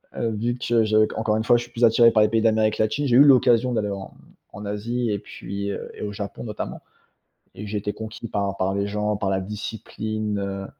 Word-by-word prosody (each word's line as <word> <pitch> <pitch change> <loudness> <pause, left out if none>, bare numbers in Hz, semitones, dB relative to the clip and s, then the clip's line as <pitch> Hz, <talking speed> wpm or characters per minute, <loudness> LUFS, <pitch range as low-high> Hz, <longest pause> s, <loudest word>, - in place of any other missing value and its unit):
Heu, 115 - -1
vu 115 +3 -1
que 120 -2 +2
je 110 0 +4
qu'encore 110 0 -1
une 110 - -1
fois, 120 - +5
je 120 - -3
suis 120 - -14
plus 120 0 -3
attiré 115 0 +6
par 110 - +4
les 105 - +3
pays 115 -1 +1
d'Amérique 110 -1 +2
latine, 110 +7 0
j'ai 120 - +3
eu 140 - +9
l'occasion 125 -3 +5
d'aller 105 -2 0
en 100 -1 -6 0.4
en 105 - -8
Asie 115 +4 -2
et 100 - 0
puis, 100 +2 -6
heu - - -6
et - - -10
au 105 - -3
Japon 100 +2 -6
notamment 105 -3 -5 0.8
et 105 - -7
j'ai 105 +1 -2
été 105 0 -3
conquis 110 +1 -7
par 100 -2 -2
par 95 0 0
les 100 0 0
gens, 105 0 -1
par 100 -1 -1
la 95 - 0
discipline. 105 +1 -4
Heu, 100 -1 -4
110 Hz, 235 wpm, -23 LUFS, 100-115 Hz, 0.8 s, eu